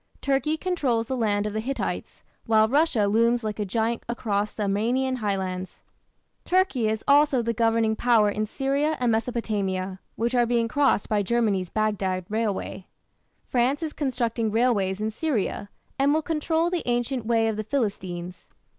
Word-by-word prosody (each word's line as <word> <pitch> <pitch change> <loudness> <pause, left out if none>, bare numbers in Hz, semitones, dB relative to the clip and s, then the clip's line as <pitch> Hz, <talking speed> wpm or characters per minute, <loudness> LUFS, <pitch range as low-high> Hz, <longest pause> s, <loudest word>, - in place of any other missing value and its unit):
Turkey 280 +3 +1
controls 285 -11 0
the 260 - -2
land 210 -4 +1
of 210 - -3
the 215 - -1
Hittites, 265 +5 -4 0.2
while 220 -1 +5
Russia 275 -4 +2
looms 230 +3 +2
like 215 -1 -4
a 210 - 0
giant 225 +4 -1
across 210 -3 -1
the 215 - -4
Armenian 240 +6 0
highlands; 190 -4 -3 0.6
Turkey 360 - +2
is 220 0 -1
also 285 -3 +4
the 230 0 0
governing 225 -1 +2
power 230 -3 +3
in 210 +1 -1
Syria 280 +6 0
and 245 -2 +2
Mesopotamia, 205 -5 -2 0.2
which 235 +2 -1
are 240 -1 +3
being 235 -1 +1
crossed 275 -4 +2
by 210 -1 +1
Germany's 200 -4 0
Baghdad 195 -4 -1
railway. 210 -3 -2 0.6
France 260 +5 +1
is 310 - -3
constructing 235 -5 -1
railways 210 -4 +1
in 215 +1 -1
Syria, 220 -6 -2 0.3
and 275 +1 +4
will 315 - 0
control 325 +2 0
the 355 -2 0
ancient 240 -1 -1
"way 225 -1 +3
of 220 - -1
the 215 - -3
Philistines". 185 -7 -3
230 Hz, 160 wpm, -25 LUFS, 210-260 Hz, 0.6 s, while